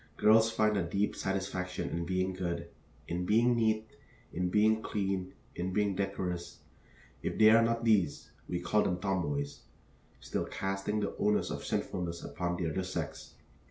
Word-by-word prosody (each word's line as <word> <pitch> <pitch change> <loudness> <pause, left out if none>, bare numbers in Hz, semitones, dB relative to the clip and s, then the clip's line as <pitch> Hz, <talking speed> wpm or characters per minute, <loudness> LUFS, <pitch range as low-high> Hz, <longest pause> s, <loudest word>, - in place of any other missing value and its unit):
Girls 110 +1 +6
find 105 -2 +2
a - - +2
deep 100 +5 0
satisfaction 95 -1 -2
in 85 0 -2
being 95 +1 0
good 85 -2 -3 0.4
in 90 +1 -2
being 115 +6 +4
neat, 110 -1 +1 0.5
in 90 +1 0
being 110 +3 +3
clean, 95 -3 -2 0.2
in 90 +1 -3
being 105 -1 +1
decorous. 90 -3 -3 0.6
If - - -3
they 110 0 +8
are 115 +1 +7
not 115 0 +1
these, 95 -10 +2 0.2
we 90 - -1
call 95 +5 +2
them 90 -3 0
tomboys, 75 -7 -1 0.6
still - - -3
casting 95 +2 -2
the 100 - -2
onus 105 0 +1
of - - -4
sinfulness 85 -1 -2
upon 85 0 -3
the 85 -3 -1
other 95 - -1
sex. 85 -5 -5
95 Hz, 160 wpm, -32 LUFS, 90-105 Hz, 0.6 s, they